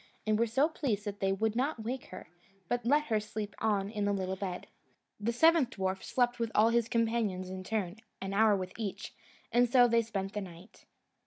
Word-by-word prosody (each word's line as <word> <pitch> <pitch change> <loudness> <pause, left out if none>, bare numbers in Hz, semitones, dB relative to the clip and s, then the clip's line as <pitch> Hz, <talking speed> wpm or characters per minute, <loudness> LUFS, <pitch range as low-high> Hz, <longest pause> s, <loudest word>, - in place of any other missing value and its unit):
and 215 0 +2
were 235 - +3
so 265 +7 +3
pleased 245 -10 -2
that 205 -1 -5
they 195 0 +1
would 220 +3 0
not 255 -1 -1
wake 250 +3 -4
her, 185 - -10 0.4
but 240 +2 -1
let 295 +3 +4
her 225 -7 0
sleep 210 -1 -5
on 205 -3 +1
in 210 -2 -2
the 205 - +2
little 190 -1 -2
bed. 185 -2 -5 0.5
The 215 +3 0
seventh 320 +1 +4
dwarf 190 -3 -2
slept 245 -1 0
with 230 -1 0
all 215 +2 +5
his 230 -1 +1
companions 225 -6 0
in 185 0 -6
turn, 200 -2 -2 0.2
an 195 0 -4
hour 215 0 +5
with 185 -1 -4
each, 205 -4 -5 0.4
and 245 0 +4
so 245 0 +6
they 235 0 +3
spent 200 -3 -4
the 210 - -2
night. 180 +1 -12
215 Hz, 210 wpm, -31 LUFS, 195-235 Hz, 0.5 s, so